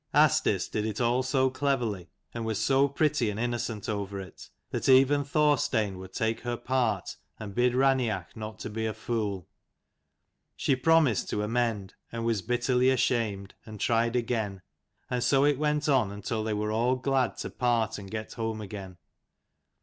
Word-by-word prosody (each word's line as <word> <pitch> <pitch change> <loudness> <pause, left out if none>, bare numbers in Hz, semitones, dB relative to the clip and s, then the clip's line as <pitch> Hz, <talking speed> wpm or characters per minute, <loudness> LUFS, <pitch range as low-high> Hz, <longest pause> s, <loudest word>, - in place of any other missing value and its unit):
Asdis - - +3
did 105 - -2
it 110 - -4
all 120 +1 +2
so 130 0 +1
cleverly, 120 - -1 0.2
and 115 - -4
was 110 -2 -1
so 135 +1 +3
pretty 140 -4 +1
and 105 +1 -4
innocent 115 -3 -2
over 100 -2 -3
it, 95 -3 -10 0.2
that - - -1
even 135 +2 +5
Thorstein 140 - +1
would 95 0 -10
take 115 -2 -1
her 120 -1 -3
part 120 -6 -1 0.2
and 105 -2 -7
bid 125 +3 +2
Rain 135 0 +4
each 105 -8 -3
not 110 -1 -7
be 110 0 -1
a 110 - -3
fool. 105 -6 -3 1.1
She 135 - +1
promised 145 -4 +3
to 105 - -1
amend, 110 -3 -1 0.2
and 115 0 -4
was 115 -4 +1
bitterly 125 +2 +2
ashamed, 110 -7 0
and' 110 -2 -10
tried 115 +2 +1
again: 110 -6 -1 0.4
and 125 -1 -1
so 135 0 +4
it 145 -2 +2
went 150 0 0
on 130 -9 +3
until 105 +2 -3
they 110 0 -1
were 105 +1 -1
all 120 +4 +2
glad 130 0 0
to - - -5
part 115 -3 0
and 100 -1 -9
get 110 +1 -5
home 115 -1 -3
again. 100 -3 -8
115 Hz, 170 wpm, -28 LUFS, 105-130 Hz, 1.1 s, even